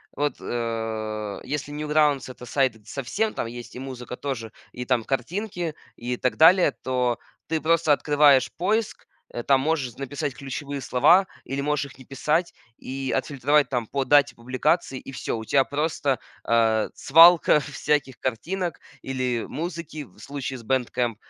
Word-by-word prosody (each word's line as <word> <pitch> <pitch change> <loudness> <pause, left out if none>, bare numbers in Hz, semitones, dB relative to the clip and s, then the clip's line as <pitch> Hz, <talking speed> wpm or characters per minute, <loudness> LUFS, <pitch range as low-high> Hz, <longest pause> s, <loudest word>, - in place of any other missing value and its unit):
вот, 145 +1 0
э, 110 -3 -3
если 145 0 -4
Newgrounds- 150 -2 +1
это 125 - -11
сайт 120 -5 0
со 140 +4 -5
всем- 215 - -1
там - - -3
есть 120 +1 -9
и - - -6
музыка 130 -2 -7
тоже, 120 -6 -4 0.2
и 125 - -6
там 125 -2 +1
картинки, 175 - -3 0.2
и 125 +1 -4
так 125 - -1
далее- 170 0 +6
то 125 -2 0 0.3
ты 160 -1 -1
просто 165 -1 +3
открываешь 145 -2 +4
поиск, 215 +4 -1 0.3
э, 120 - -3
там 135 +2 +3
можешь 140 -5 -1
написать 140 0 -4
ключевые 140 +1 -5
слова 150 +11 +5 0.2
или 135 +1 -3
можешь 150 0 0
их - - -18
не 130 - -14
писать, 155 +6 0 0.2
и 135 0 -4
отфильтровать 140 +1 +2
там 120 -4 -2
по 135 +2 -2
дате 145 +2 +4
публикации, 130 +4 0
и - - -10
всё. 125 - -3
У 110 - -6
тебя 135 +4 +4
просто, 145 -3 -1 0.3
э, 110 -2 +3
свалка 165 +1 +7
всяких 145 -2 -1
картинок 170 - -3 0.2
или 130 -3 -2
музыки 160 -2 -5
в 120 - -19
случае 135 +1 -5
с - - -13
Bandcamp. 125 -1 0
135 Hz, 160 wpm, -25 LUFS, 125-150 Hz, 0.3 s, свалка